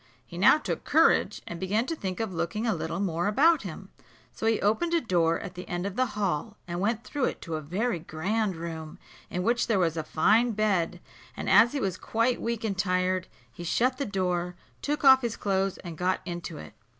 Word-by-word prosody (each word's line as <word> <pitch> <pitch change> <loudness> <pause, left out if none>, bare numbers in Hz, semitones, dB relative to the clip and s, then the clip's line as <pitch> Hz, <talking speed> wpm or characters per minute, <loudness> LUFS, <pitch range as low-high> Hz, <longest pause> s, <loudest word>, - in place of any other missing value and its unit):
He 170 - -12
now 200 +10 +7
took 305 - -4
courage, 320 +3 +3
and 170 - -7
began 210 +5 0
to 330 - -3
think 190 - -4
of 220 -4 -2
looking 170 +7 -2
a 225 - +2
little - - -3
more 175 -2 0
about 295 +9 +4
him; 190 0 -8 0.4
so 220 - -3
he 225 -1 +3
opened 330 +12 +1
a - - +4
door 170 - +1
at 180 - -7
the 180 - -8
end 175 +1 -3
of 200 -1 -4
the 255 +2 +2
hall, 200 +1 -1
and 175 0 -3
went 225 +4 0
through 285 -3 -1
it - - -1
into 165 - -8
a 155 - -2
very 180 +6 -1
grand 190 +6 -1
room, 160 -1 -6 0.3
In 180 - -2
which 235 +3 +1
there 220 -3 +2
was 170 -3 +1
a 160 - -2
fine 220 +11 +3
bed; 190 -5 0 0.4
and - - -4
as 225 +6 +6
he 285 - -1
was 190 -6 -1
quite 230 +2 0
weak 230 -1 -2
and 210 -3 -1
tired, 185 -1 0 0.3
he 175 - -8
shut 255 +9 +1
the 280 - 0
door, 180 -3 -1 0.3
took 295 +1 -2
off 265 -1 +8
his 235 -3 -3
clothes, 195 -1 0
and 170 -3 -8
got 185 +1 +1
into 175 -2 -5
it. 110 - -10
195 Hz, 220 wpm, -27 LUFS, 175-230 Hz, 0.4 s, off